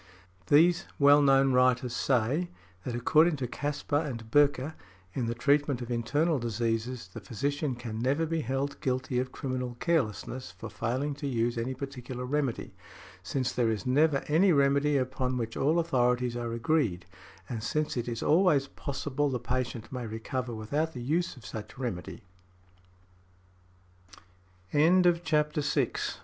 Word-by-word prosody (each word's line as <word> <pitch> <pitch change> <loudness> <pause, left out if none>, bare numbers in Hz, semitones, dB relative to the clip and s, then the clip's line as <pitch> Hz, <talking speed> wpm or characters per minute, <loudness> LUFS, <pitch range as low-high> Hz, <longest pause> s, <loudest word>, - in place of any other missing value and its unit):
These 170 +5 +5
well 145 +1 +6
known 135 -1 +4
writers 125 -1 +3
say, 135 +9 +1 0.4
that 120 - -3
according 155 +7 +4
to 135 -3 -3
Caspar 145 +2 -2
and 115 -7 -6
Böcker, 145 +1 +3 0.4
in 120 +2 -2
the 115 - -2
treatment 140 +1 +2
of 120 -1 -6
internal 145 +7 +1
diseases, 115 +1 -2
the 115 - -6
physician 140 +7 -2
can 115 -2 -6
never 140 +7 +1
be 165 0 -1
held 135 +3 -3
guilty 130 -1 -1
of 130 0 -2
criminal 125 -2 -4
carelessness 130 - -1
for 110 +3 -8
failing 130 +7 -2
to 140 +1 -5
use 120 -2 0
any 120 +3 -2
particular 130 -2 -6
remedy, 135 -2 -2 0.5
since 130 +7 -2
there 120 -2 +1
is 110 +2 -2
never 140 +2 +3
any 175 +6 +4
remedy 140 0 +3
upon 130 -1 -1
which 115 -2 -3
all 155 +5 +2
authorities 125 -6 +1
are 120 -1 -3
agreed, 115 - 0 0.4
and 115 -3 -4
since 150 +6 -1
it 120 -1 -2
is 115 -1 -3
always 155 -4 +4
possible 140 +1 -2
the 125 -2 -2
patient 125 -1 -3
may 125 -3 -4
recover 120 +2 -4
without 145 +9 -2
the 125 - -6
use 165 +4 -1
of 120 - -14
such 105 +4 -8
remedy. 115 -5 -5 2.5
|93| 175 +3 +4
CHAPTER 150 -2 +1
VII. 140 - 0
130 Hz, 150 wpm, -29 LUFS, 120-145 Hz, 2.5 s, well